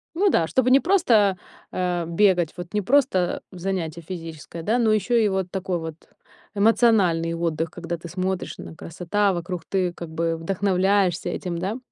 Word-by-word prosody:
Ну 390 +2 +3
да, 165 - +2
чтобы 255 +6 +1
не 270 +1 +7
просто, 225 - +3 0.3
а, 175 -2 -1
бегать, 175 -2 +2
вот 175 +1 -8
не 210 - +2
просто 190 -7 +2
занятие 175 -3 -3
физическое, 165 -1 -8
да, 225 +7 +1
но 225 -2 +3
ещё 215 +3 +1
и 220 -2 +4
вот 190 -2 -2
такой 190 -2 -2
вот 160 -1 -6 0.6
эмоциональный 200 -6 +3
отдых, 165 -1 -1
когда 170 -1 -5
ты 170 +1 -10
смотришь 185 +1 -3
на - - -9
красота 185 +5 -1
вокруг, 175 -1 -4
ты 185 -3 0
как 170 -1 -8
бы 165 +1 -1
вдохновляешься 190 +1 +1
этим, 175 -2 -3
да. 200 +7 -3
180 Hz, 165 wpm, -24 LUFS, 170-205 Hz, 0.6 s, не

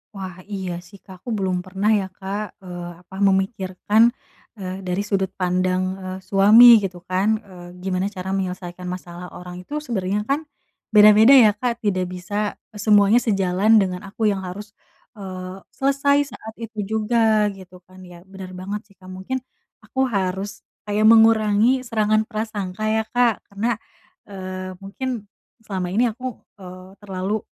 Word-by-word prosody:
Wah 185 -2 -7
iya 190 -3 -4
sih 200 - -15
Kak. 190 -2 -13
Aku 240 - -9
belum 185 -2 0
pernah 195 +3 -1
ya 205 -3 +2
Kak, 195 +3 -5 0.2
eee, 175 -1 -7 0.2
apa 190 - -14
memikirkan 195 +1 +1 0.6
e - - -11 0.3
dari 180 +2 0
sudut 195 -2 0
pandang 185 0 +1 0.2
e - - -8 0.2
suami 205 +5 +7 0.2
gitu 190 -2 -4
kan 185 +2 +1 0.2
e 200 - -17 0.3
gimana 190 +1 -1
cara 190 -1 -5
menyelesaikan 180 -1 -4
masalah 180 -1 -7
orang 180 0 -9
itu 180 - -11
sebenarnya 205 -6 -1
kan, 280 +2 +2 0.6
beda-beda 215 +4 +8
ya 230 -5 +8
Kak 240 -1 -2
tidak 185 -3 0
bisa 185 +2 -7 0.4
e - - -10
semuanya 210 +2 +5
sejalan 195 -1 +1
dengan 185 -2 -2
aku 210 +2 0
yang 195 -1 -3
harus, 205 +3 -8 0.5
eee, 185 -1 -7 0.2
selesai 280 +1 +2
saat 220 0 -9
itu 225 -1 -8
juga 220 -1 +2
gitu 185 -2 -14
kan. 185 +1 -17
Ya 175 -1 -13
benar 190 -1 -10
banget 200 +3 -5
sih 200 - -24
Kak. 185 -1 -14
Mungkin, 190 +8 -4 0.5
aku 265 - -3
harus 195 -1 -3 0.2
kayak 210 +1 +1
mengurangi 225 +2 +5
serangan 215 -2 +1
prasangka 215 -3 -4
ya 220 0 +1
Kak, 245 -2 +2
karena, 225 +4 -1 0.5
eee, 185 -1 -6
mungkin, 215 +2 -5 0.4
selama 190 -3 -3
ini 240 +5 +3
aku, 245 +4 -9 0.3
eee, 185 0 -12
terlalu 195 +2 -3
195 Hz, 150 wpm, -22 LUFS, 185-215 Hz, 0.6 s, beda-beda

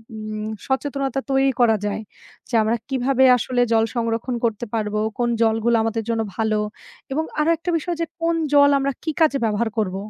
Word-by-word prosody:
উম 215 0 -5 0.2
সচেতনতা 275 0 -1
তৈরি 270 0 +3
করা 230 -2 +5
যায়, 205 +1 -2 0.5
যে, - - -14
আমরা 220 +2 +1
কিভাবে 265 0 +2
আসলে 245 +1 -1
জল 225 0 +4
সংরক্ষণ 230 +1 -1
করতে 230 +1 -1
পারব, 215 -2 -1 0.2
কোন 240 -1 +1
জলগুলো 225 +1 +2
আমাদের 225 0 -1
জন্য 225 -1 +1
ভালো 220 -1 0 0.5
এবং 305 +4 0 0.2
আরো 305 +2 +2
একটা 335 +2 -5
বিষয় 345 +2 -3
যে, - - +1 0.2
কোন 335 0 +1 0.2
জল 285 0 +7
আমরা 275 0 0
কি 320 - -1
কাজে 305 -3 +4
ব্যবহার 220 +1 0
করব। 190 -4 0
240 Hz, 180 wpm, -22 LUFS, 220-275 Hz, 0.5 s, জল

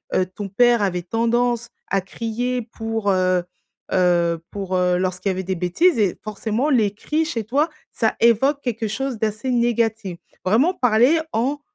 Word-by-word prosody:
heu, 185 - +3
ton 195 +2 -7
père 240 +3 +4
avait 180 -3 -1
tendance 235 +3 0 0.2
à 195 - +1
crier 235 +5 -3
pour, 225 -2 -3
heu 185 -1 +2 0.5
heu, 170 -2 +2
pour, 195 -2 -3
heu, 180 -1 +2
lorsqu'il 185 +1 -1
y - - +1
avait 185 +1 -4
des 190 +1 -2
bêtises 185 - +2
et 200 -4 +1
forcément 220 +5 -2
les 220 -8 +2
cris 300 +9 -1
chez 235 -8 -3
toi, 285 +9 +1 0.2
ça 220 -2 0
évoque 265 +5 +3
quelque 230 -4 -2
chose 270 +3 -3
d'assez 215 +3 -2
négatif. 225 -5 0 0.3
Vraiment 240 - +3
parler 250 +4 +3
en, 260 +6 0
220 Hz, 165 wpm, -21 LUFS, 190-245 Hz, 0.5 s, père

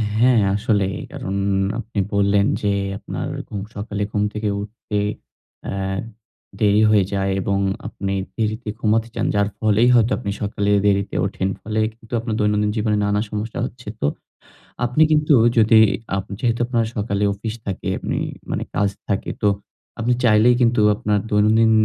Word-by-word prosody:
হ্যাঁ, 120 0 +4
আসলেই। 100 -2 0
কারণ 95 - -4 0.4
আপনি 115 -2 -4
বললেন 100 0 +3 0.2
যে, 105 - +1 0.3
আপনার - - -5 0.2
ঘুম 100 - -4
সকালে 105 0 -3
ঘুম 105 -1 0
থেকে 105 0 -2
উঠতে 105 0 -4 0.6
অ্যা - - -4 0.8
দেরি 105 0 +4
হয়ে 105 -3 +4
যায় 95 0 0
এবং 100 +1 0 0.3
আপনি 100 -3 -4 0.2
দেরিতে 110 0 -2
ঘুমাতে 110 +1 +1
যান। - - 0
যার 100 0 +3
ফলেই 110 +2 +3
হয়তো 115 0 +4
আপনি 110 -4 -3
সকালে 100 0 -1 0.2
দেরিতে 100 0 +1
ওঠেন। 95 0 -2
ফলে 110 +1 -2 0.2
কিন্তু 115 +1 -15
আপনার 115 -1 -3
দৈনন্দিন 105 0 +2
জীবনে 105 -1 +1
নানা 105 0 +1
সমস্যা 105 +2 -4
হচ্ছে। 125 -2 -10
তো - - +1 0.8
আপনি 125 +6 +1
কিন্তু 150 -1 +4 0.2
যদি 110 0 +6 0.4
আপ 95 - -2 0.2
যেহেতু 120 -2 0
আপনার 120 -2 0
সকালে 100 -1 -1
অফিস 110 +2 -5
থাকে 95 -2 -4
আপনি - - -3 0.3
মানে - - -1
কাজ 100 0 +2 0.2
থাকে, 100 -1 -1
তো 105 - +3 0.5
আপনি 120 +2 +2
চাইলেই 115 +1 +5
কিন্তু 120 -2 +3
আপনার 105 -2 0
দৈনন্দিন 110 +2 +4
105 Hz, 155 wpm, -21 LUFS, 100-115 Hz, 0.8 s, যদি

